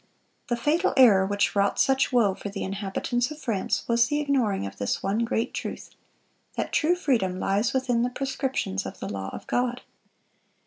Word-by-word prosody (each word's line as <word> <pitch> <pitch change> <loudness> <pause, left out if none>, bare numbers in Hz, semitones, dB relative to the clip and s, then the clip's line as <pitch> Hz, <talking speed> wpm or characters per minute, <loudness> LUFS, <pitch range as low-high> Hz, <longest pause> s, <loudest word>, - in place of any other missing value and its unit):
The 240 - 0
fatal 300 +9 +1
error 205 -7 +6
which 205 +1 0
wrought 200 0 +2
such 270 0 +3
woe 230 -6 +3
for 205 - -7
the 200 0 -5
inhabitants 200 +5 -2
of 305 - -8
France 220 -9 -1
was 235 0 +3
the 295 +3 0
ignoring 255 - 0
of 100 0 -7
this 100 - -1
one 200 +3 0
great 230 -1 -1
truth: - - -6 0.7
that - - -2
true 335 +3 +3
freedom 225 - 0
lies 205 +5 +1
within 255 -3 +1
the 245 - +1
proscriptions 265 - -2
of - - -9
the 100 - -5
law 95 -1 -4
of - - -8
God. 245 0 -1
235 Hz, 180 wpm, -26 LUFS, 195-260 Hz, 0.7 s, error